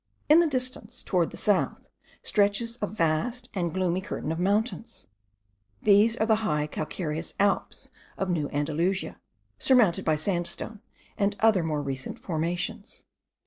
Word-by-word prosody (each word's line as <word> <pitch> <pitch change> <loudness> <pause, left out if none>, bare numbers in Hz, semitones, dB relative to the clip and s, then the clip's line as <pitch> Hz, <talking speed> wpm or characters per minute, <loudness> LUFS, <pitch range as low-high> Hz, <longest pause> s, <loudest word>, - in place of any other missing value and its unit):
In 310 +2 +8
the 340 - +4
distance, 255 -4 -1
towards 175 -4 +1
the - - -10
south, 205 -3 +1 0.4
stretches 220 +3 +1
a 205 - 0
vast 215 +8 -1
and 175 -4 -1
gloomy 185 0 0
curtain 175 -5 -4
of 165 - -3
mountains. 210 +5 -1 0.8
These 215 +3 +5
are 220 - +1
the 220 -1 +3
high 150 -9 0
calcareous 155 +1 -4
Alps 200 0 0 0.3
of 195 - -1
New 160 -5 -1
Andalusia, 160 +6 -1 0.4
surmounted 235 -10 +4
by 155 - +2
sandstone, 175 +6 -2 0.4
and 200 0 +1
other 220 -4 +4
more 155 -2 -1
recent 135 -2 -4
formations. 175 +5 -3
195 Hz, 140 wpm, -27 LUFS, 165-220 Hz, 0.8 s, In